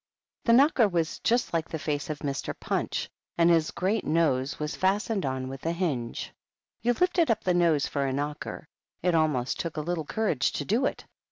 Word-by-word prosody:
The 230 - +5
knocker 265 -2 +5
was 170 -4 -1
just 240 -3 +1
like 165 -1 -1
the 160 - -3
face 145 -1 -3
of 155 - -2
Mr. 140 -1 -3
Punch, - - -2 0.3
and 170 0 +5
his 165 -2 +3
great 195 +4 0
nose 145 -5 +1
was 150 0 -3
fastened 195 -1 +1
on 130 0 -2
with 135 0 -8
a 165 - 0
hinge. 145 -10 -3 0.5
You 240 +2 +2
lifted 355 +2 +2
up 230 - +1
the 180 - +2
nose 170 -5 +3
for 140 -1 -1
a - - -1
knocker; 145 +2 -4 0.4
it 180 -1 +2
almost 150 -6 +1
took 165 -2 -4
a - - 0
little 165 0 -2
courage 160 -8 0
to 145 - -3
do 240 - +2
it. - - -5
165 Hz, 195 wpm, -27 LUFS, 145-200 Hz, 0.5 s, The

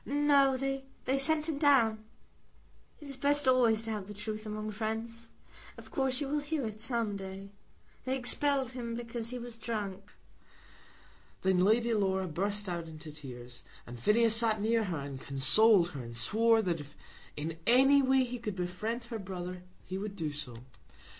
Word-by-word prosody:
"No; 280 -2 +3
they 270 0 -3
sent 310 +2 +3
him 305 -3 -2
down. 235 -7 +4 1.0
It 295 - -11
is 275 -1 -6
best 290 +1 +2
always 235 -4 +4
to 225 - -3
have 205 -3 -4
the 210 - -8
truth 215 +1 -5
among 215 0 -4
friends. 225 +2 -4 0.5
Of - - -13
course 265 -1 +1
you 285 - -2
will 295 +2 0
hear 295 -2 -2
it 215 -1 -6
some 230 -3 -1
day. 195 0 -8 0.5
They 260 +1 0
expelled 270 0 +2
him 235 -2 -5
because 235 -1 -5
he 250 - -5
was 240 -1 -7
drunk." 205 -4 -5 1.3
Then 190 -1 +3
Lady 230 +3 +3
Laura 190 -3 +1
burst 200 +5 -2
out 170 -2 -4
into 155 -1 -10
tears, 125 -5 -9 0.2
and 120 0 -9
Phineas 220 - +4
sat 225 -2 +3
near 225 +1 +1
her, 175 -4 -3
and 140 -1 -7
consoled 175 +7 +4
her, 140 -6 -7
and 115 -1 -8
swore 225 - +3
that 175 -4 -1
if 145 -1 -11 0.4
in 160 +2 -4
any 270 +4 +6
way 265 0 +3
he 245 0 -5
could 210 -4 -4
befriend 185 +7 -3
her 230 -1 -6
brother 180 -2 -6 0.2
he 190 +1 -4
would 200 0 -5
do 160 -6 -3
so. 145 -5 -7
220 Hz, 175 wpm, -31 LUFS, 190-255 Hz, 1.3 s, any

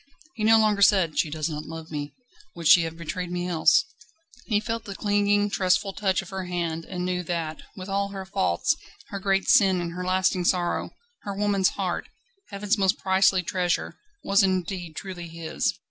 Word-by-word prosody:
He 215 - -5
no 225 +1 +6
longer 215 -2 +2
said: 190 -6 +4
"She 155 - +1
does 155 +1 -2
not 150 -2 -5
love 160 0 -8
me 145 -1 -5 0.4
would 170 -2 -2
she 170 - +8
have 165 0 -6
betrayed 175 +2 -5
me 180 0 -2
else?" 175 - +4 0.6
He 210 -4 +2
felt 230 +1 -4
the 200 - -7
clinging, 205 0 +1
trustful 190 +1 +1
touch 190 -2 0
of 185 - -13
her 190 -1 -4
hand, 170 -2 -3
and 180 0 -4
knew 180 0 -1
that, 165 -3 -4 0.2
with 185 0 -7
all 200 0 0
her 195 -1 -7
faults, 190 - +1 0.3
her 200 - -5
great 195 0 +1
sin 190 -2 +5
and 170 -1 -4
her 180 +1 -5
lasting 185 0 +1
sorrow, 175 -1 0 0.3
her 200 -1 -6
woman's 200 -2 +2
heart, - - -2 0.4
Heaven's 205 +1 -1
most 190 -1 +2
priceless 190 -1 +3
treasure, 180 0 -1 0.3
was 195 +1 +4
indeed 185 -3 -1
truly 180 -3 -7
his. 165 -1 -2
185 Hz, 185 wpm, -25 LUFS, 170-200 Hz, 0.6 s, she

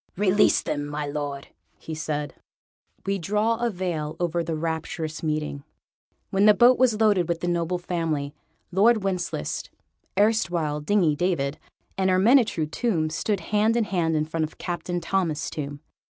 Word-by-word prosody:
"Release 205 +1 +4
them, 145 -1 -2
my 150 0 -3
Lord," 145 -1 -4 0.3
he 160 - -7
said. 150 -1 -3 0.7
We 195 0 0
draw 210 +6 +1
a 240 +1 0
veil 175 -6 -3
over 170 -1 0
the 165 0 -3
rapturous 160 0 -3
meeting. 150 -2 -2 0.7
When 195 +1 +3
the 210 - +7
boat 245 +3 +6
was 240 -4 +3
loaded 205 -6 +3
with 170 -1 -1
the 175 - -2
noble 175 0 0
family, 165 -5 -2 0.4
Lord 215 +3 +4
Wencheslaus 190 -2 -2 0.5
(erstwhile 175 -8 +1
Dingy 165 -2 +2
David) 150 -4 -1 0.4
and 190 0 +2
Ermyntrude 190 - +3
Tomb 165 -10 0
stood 200 +4 -1
hand 215 +2 +3
in 235 - +3
hand 170 -5 0
in 155 0 +1
front 160 +1 -2
of 155 - -5
Captain 175 0 -3
Thomas 170 -3 -1
Tomb. 145 -1 -5
175 Hz, 150 wpm, -25 LUFS, 155-200 Hz, 0.7 s, the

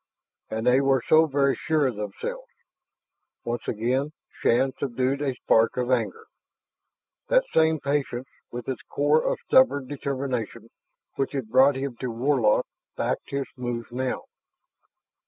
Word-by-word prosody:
And 110 +1 -3
they 125 +2 +5
were 135 -3 +2
so 160 +1 +6
very 140 -1 +2
sure 155 -2 +1
of 130 -4 0
themselves.... 300 - -5 1.0
Once 120 0 -4
again 130 +7 -1 0.3
Shann 130 +3 +3
subdued 130 +1 -1
a 135 -3 -1
spark 115 -1 +2
of 125 0 0
anger. 120 -4 -1 1.0
That - - +4
same 160 -1 +3
patience 140 -2 -2 0.2
with 120 -1 -7
its 130 -3 -3
core 150 +2 +3
of - - 0
stubborn 250 - +4
determination 130 -5 -4 0.5
which 135 - -1
had 135 -6 -3
brought 130 +3 +5
him 135 -2 -4
to 125 - -4
Warlock 120 -2 +2 0.3
backed - - -2
his 140 -1 -2
moves 120 -1 -4
now. 130 +1 -2
130 Hz, 135 wpm, -25 LUFS, 120-140 Hz, 1.0 s, so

